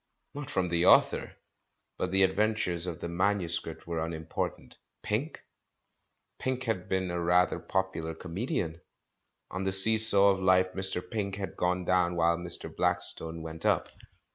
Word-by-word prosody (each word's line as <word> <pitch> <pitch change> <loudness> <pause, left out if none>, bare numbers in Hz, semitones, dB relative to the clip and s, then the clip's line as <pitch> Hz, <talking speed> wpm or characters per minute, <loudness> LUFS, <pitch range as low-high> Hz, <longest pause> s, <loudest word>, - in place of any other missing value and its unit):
Not 145 0 -8
from 95 -9 -2
the 85 +1 +1
author. - - +3 0.7
But 90 - -2
the 95 +1 +2
adventures 95 -3 0
of 85 -1 -6
the - - -4
manuscript 85 -2 -2
were 85 -1 -3
unimportant. 80 -1 -6 0.2
Pink? 130 +10 -4 1.0
Pink 130 0 -3
had 110 -7 -4
been 95 -1 -2
a 85 0 -3
rather 90 +1 +1
popular 95 -4 -3
comedian. 85 -2 -5 0.7
On 90 +1 -4
the 95 - -1
see 110 +4 +5
saw 100 -2 +10
of 95 - -2
life 95 0 +2
]Mr. 95 -1 -1
Pink 100 0 -4
had 100 -1 -7
gone 90 0 -2
down 90 -1 +1
while 85 0 +2
]Mr. 85 -1 -5
Blackstone 80 0 -1
went 80 0 -7
up. - - 0
90 Hz, 150 wpm, -28 LUFS, 85-100 Hz, 1.0 s, saw